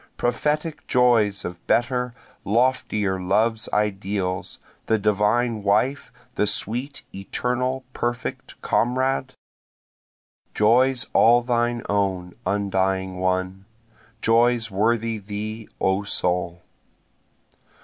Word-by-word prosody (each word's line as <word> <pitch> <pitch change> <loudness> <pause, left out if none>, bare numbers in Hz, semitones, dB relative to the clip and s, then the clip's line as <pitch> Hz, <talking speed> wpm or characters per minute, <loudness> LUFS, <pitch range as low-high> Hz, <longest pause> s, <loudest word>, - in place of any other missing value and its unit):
Prophetic 150 +5 -1
joys 115 -6 +3
of 90 -1 -7
better, 125 0 +1 0.3
loftier 110 -4 +1
love's 110 +4 +1
ideals, 100 -2 -1 0.3
the 110 - +3
divine 105 +2 +1
wife, 110 +8 +1 0.2
the 105 - +1
sweet, 125 +8 -2
eternal, 125 +6 -2
perfect 120 +1 -4
comrade? 130 +2 0 1.2
Joys 125 +4 +3
all 120 +1 +5
thine 120 -1 0
own 95 -3 -1
undying 95 -2 0
one, 95 +1 -1 0.6
joys 115 -1 +3
worthy 115 +2 0
thee 105 +2 -6
O 95 +1 +1
soul. 90 -3 -1
110 Hz, 85 wpm, -23 LUFS, 95-120 Hz, 1.2 s, all